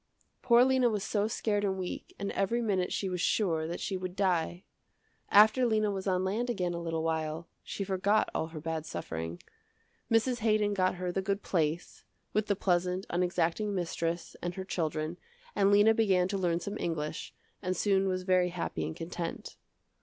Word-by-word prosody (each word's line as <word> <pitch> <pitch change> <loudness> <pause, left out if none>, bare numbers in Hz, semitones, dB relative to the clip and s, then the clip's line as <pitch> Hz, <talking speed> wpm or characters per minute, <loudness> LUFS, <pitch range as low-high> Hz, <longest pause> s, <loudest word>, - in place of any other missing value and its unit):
Poor 240 0 +6
Lena 260 -2 +3
was 210 -3 -2
so 210 0 0
scared 210 -2 -1
and 190 -1 0
weak, 185 -1 -6
and 200 0 -3
every 195 +5 0
minute 195 -6 0
she 195 - -1
was 180 -2 -2
sure 165 -8 +1
that 170 - -4
she 195 - -2
would 185 -1 -4
die. 180 -2 0 0.7
After 215 +5 +6
Lena 215 -3 +2
was 195 0 -4
on 185 -1 +1
land 220 +6 -1
again 180 -7 -1
a 170 - -4
little 165 -1 -2
while, 160 0 -2
she 200 - -4
forgot 195 +2 +2
all 160 - -1
her 160 -1 -8
bad 160 0 -4
suffering. 80 +1 -5 0.7
Mrs. 235 +2 +2
Haydon 215 -2 +2
got 185 -2 +1
her 180 0 -3
the 195 - -1
good 200 +1 -2
place, 165 -1 -1 0.3
with 215 0 +1
the 200 - +2
pleasant 180 0 0
unexacting 180 +3 0
mistress, 170 -1 -2
and 175 0 -3
her 190 -1 -5
children, 155 -2 -2 0.4
and 195 -1 +4
Lena 205 +2 +6
began 190 -5 +3
to 200 - -2
learn 170 -2 +1
some 205 +3 -5
English 155 -3 -3 0.3
and 185 -2 -2
soon 195 -2 +2
was 185 -1 -1
very 185 -1 +3
happy 170 - -3
and 80 - -5
content. 165 0 -5
185 Hz, 185 wpm, -30 LUFS, 170-205 Hz, 0.7 s, Poor